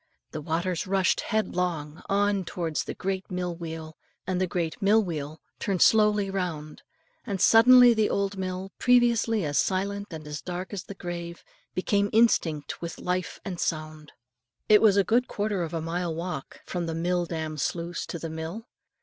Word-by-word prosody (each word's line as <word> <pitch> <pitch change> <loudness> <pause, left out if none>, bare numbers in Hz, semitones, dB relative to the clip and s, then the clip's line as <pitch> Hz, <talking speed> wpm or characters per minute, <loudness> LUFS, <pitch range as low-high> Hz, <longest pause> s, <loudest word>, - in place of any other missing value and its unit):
The 155 - -5
waters 170 +4 -2
rushed 190 -1 +2
headlong 175 -8 -2
on 200 0 +2
towards 165 -3 -3
the - - -5
great 190 0 -3
mill 180 -2 -3
wheel; 160 -2 -7 0.3
the 185 0 0
great 165 -2 -3
mill 210 +3 +4
wheel 155 -3 -5 0.2
turned 190 -3 +2
slowly 210 -2 +4
round; 165 -6 -4 0.4
and 200 -5 -3
suddenly 245 +4 +8
the 220 -2 +2
old 200 0 -1
mill, 190 0 -4
previously 235 -5 +3
as 145 -1 +1
silent 200 +2 -1
and 160 -3 -8 0.2
dark 180 +2 -5
as 195 - -5
the 200 - -8
grave 170 -2 -6
itself, - - -33
became 200 +2 +1
instinct 170 -10 +2
with 170 0 -5
life 180 0 -3
and 180 -4 -5
sound. 155 -1 -3 0.6
It 210 -1 +7
was 205 -3 +5
a 200 - +5
good 240 +6 +2
quarter 205 -2 -2
of 165 -2 -3
a 165 -2 -2
mile 165 0 -2
walk, 170 -4 -6
from 175 -2 -3
the 165 - -3
mill 175 +1 0
dam 160 -2 -4
sluice 170 +4 -3
to - - -5
the 165 0 -5
mill. 160 +8 -6
180 Hz, 170 wpm, -27 LUFS, 165-200 Hz, 0.6 s, suddenly